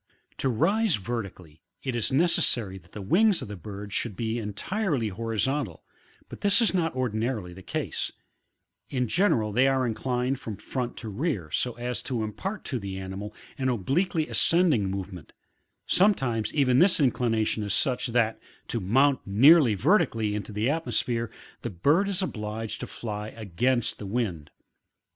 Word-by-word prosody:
To 135 - 0
rise 185 - +2
vertically, 95 -8 -6 0.2
it 130 -3 -2
is 115 - -1
necessary 125 - +1
that 85 0 -23
the 105 - -6
wings 190 - +3
of - - -7
the 105 - -6
bird 100 +3 -8
should 105 -5 -3
\ye 115 +1 -1
entirely 120 - -1
horizcmtal, 115 - -2 0.5
but - - -10
this 205 +2 +4
is 230 -4 +2
not 165 -6 0
ordinarily 110 -6 -2
the 95 - -11
case; - - -3 0.8
in 125 -2 0
general 115 - +2
they 125 +5 +4
are 135 -1 +2
inclined 125 +3 -1
from 110 -6 -6
front 125 -2 -4
to 115 - -5
rear 105 - -2
so 125 +8 0
as 120 +1 -3
to 120 -5 -2
impart 190 - -5
to 130 - -2
the 100 -2 -5
animal 95 +2 -6 0.2
an 130 -1 +1
obliquely 150 - 0
ascending 160 - +3
movement; 95 -3 -6 0.5
sometimes 130 - +2
even 130 -4 +3
this 180 +1 +5
inclination 115 -5 +1
is 105 -1 -1
such, 125 +3 0
that, 115 -2 +1 0.3
to 120 - 0
mount 130 +8 +3
neariy 130 +1 +6
vertically, 115 - +2
into 105 +1 -4
the 105 +2 0
atmosphere, 125 -6 -1 0.3
the 120 - -3
bird 145 - +2
is 195 -1 0
obliged 110 -6 -4
to - - -5
fly 105 -2 -5
against 115 +4 0
the 105 - -6
wind. 95 -9 -2
120 Hz, 155 wpm, -27 LUFS, 105-140 Hz, 0.8 s, neariy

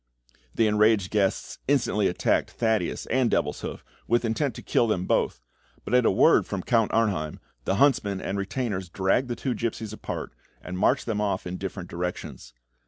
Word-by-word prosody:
The 115 - +3
enraged 105 -2 +3
guests 100 -3 0
instantly 120 -7 +2
attacked 90 - +1
Thaddeus 110 -6 -1
and 125 -1 +3
Devilshoof, - - -2 0.2
with 120 +1 +2
intent 115 +2 -1
to - - -9
kill 120 - +2
them 95 -4 0
both, - - 0 0.4
but - - -4
at 125 -2 +5
a - - +6
word - - +4
from 95 -2 -3
Count 115 -3 +2
Arnheim, 100 -10 0 0.3
the 95 - +1
huntsmen 105 -6 +2
and 95 - -3
retainers 100 -2 -3
dragged 95 +8 +1
the 120 - -3
two 125 +2 -2
gipsies 110 -2 -3
apart, 110 - -6 0.3
and 90 0 -6
marched 105 - +2
them 110 -3 -1
off 100 -3 -1
in 90 +1 -4
different 95 -1 -5
directions. 85 -8 -5
105 Hz, 170 wpm, -26 LUFS, 95-115 Hz, 0.4 s, a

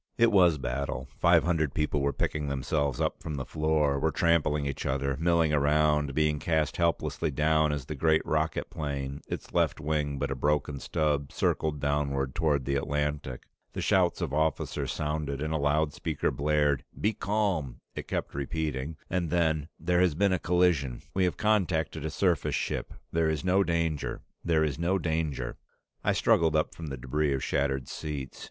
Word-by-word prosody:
It 115 -1 +5
was 90 -6 +5
battle. 65 0 -3
Five - - +5
hundred 80 -5 0
people 75 -2 0
were 70 +1 +1
picking 75 +1 -2
themselves 70 0 -1
up - - -1
from 75 - -4
the 65 -2 -4
floor, 75 -2 +1
were 80 - +2
trampling 80 -3 +2
each 70 -1 -3
other, 70 0 0
milling 85 -2 +3
around, 75 -1 +2
being 75 -1 +2
cast 80 -1 0
helplessly 85 -1 0
down 75 +1 +2
as 75 -3 -3
the 75 - -5
great 80 +2 +2
rocket 80 0 -1
plane, 70 -2 -4
its - - -6
left - - +1
wing 75 -1 -1
but 70 0 -2
a - - -1
broken 75 +1 0
stub, 75 -2 -1
circled 75 -2 0
downward 70 -2 0
toward 75 -6 +1
the 70 - -1
Atlantic. 75 -2 -2 0.3
The - - -3
shouts 90 -1 +2
of 80 -5 -2
officers 80 +1 0
sounded 75 -2 -2
and 75 +2 -2
a - - +1
loudspeaker 75 0 0
blared. 75 -1 +1 0.2
"Be 110 +2 +1
calm," 95 - -1
it - - -6
kept - - -3
repeating, 75 +1 -3
and 85 -2 -1
then, 80 -3 +1
"There 90 +2 +2
has 90 -5 +3
been 100 +2 +3
a 95 - +1
collision. 85 -8 +1
We 95 -1 +2
have 90 - -1
contacted 90 -8 +1
a - - -1
surface 90 0 +1
ship. - - -2 0.2
There 80 -1 +2
is 80 +2 -2
no 95 +2 +4
danger 85 -4 -1 0.2
There 80 -2 +2
is 75 -2 -1
no 90 +3 +2
danger 80 -7 -2 0.2
" - - -47
I - - +2
struggled 80 -2 +3
up 75 - +1
from 80 - -7
the 70 -2 -5
debris 70 +3 0
of 65 - -3
shattered 70 -2 0
seats. 75 -4 -6
75 Hz, 180 wpm, -28 LUFS, 70-80 Hz, 0.3 s, It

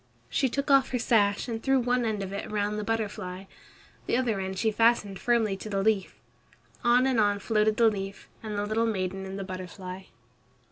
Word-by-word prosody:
She 265 - +2
took 280 +3 -1
off 275 -1 +5
her 255 - -1
sash 205 -3 +2
and 225 -2 -4
threw 270 +1 +3
one 245 0 +1
end 215 -3 -1
of 195 0 -6
it 200 - -5
round 210 0 -1
the - - -3
butterfly. 200 -4 -3 0.6
The - - +2
other 235 -6 0
end 190 0 -4
she 220 +2 +1
fastened 215 -3 +2
firmly 230 -4 +2
to 215 - -8
the 195 -1 0
leaf. 210 -3 +1 0.7
On 245 +2 +4
and 260 -3 +2
on 205 -1 +3
floated 215 +1 +1
the 230 - +5
leaf, 195 -2 -3
the 220 - -7 0.2
little 225 +2 +1
maiden 190 -2 -2
and 190 +1 -6
the 195 - -4
butterfly. 185 0 -7
210 Hz, 195 wpm, -28 LUFS, 195-230 Hz, 0.7 s, off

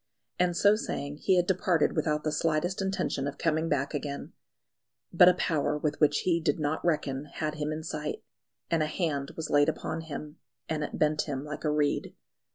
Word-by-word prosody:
And 175 -1 +2
so 205 +1 +5
saying 145 -9 -4
he 185 - +2
had 175 - +3
departed 180 -3 +2
without 150 -1 0
the 155 - 0
slightest 165 +5 0
intention 190 -7 -1
of 140 - -5
coming 160 0 0
back 140 0 0
again. 145 -1 -4 0.8
But 180 +1 +8
a 180 - +3
Power 150 -4 0
with 150 -1 -2
which 150 -1 +3
he 170 -2 +2
did 165 - +1
not 150 +1 -1
reckon 145 -4 0
had 150 +1 -3
him 150 0 -3
in 155 +1 -4
sight; 150 -2 -4 0.5
and 165 -1 +3
a 155 - +1
Hand 150 -5 -2
was 160 -1 -4
laid 145 +1 +5
upon 160 +1 -3
him, 150 0 -7 0.3
and 155 -1 -1
it - - -4
bent 155 0 +1
him 140 0 -3
like 150 0 -6
a 155 - +1
reed. 150 -1 0
155 Hz, 195 wpm, -29 LUFS, 145-165 Hz, 0.8 s, But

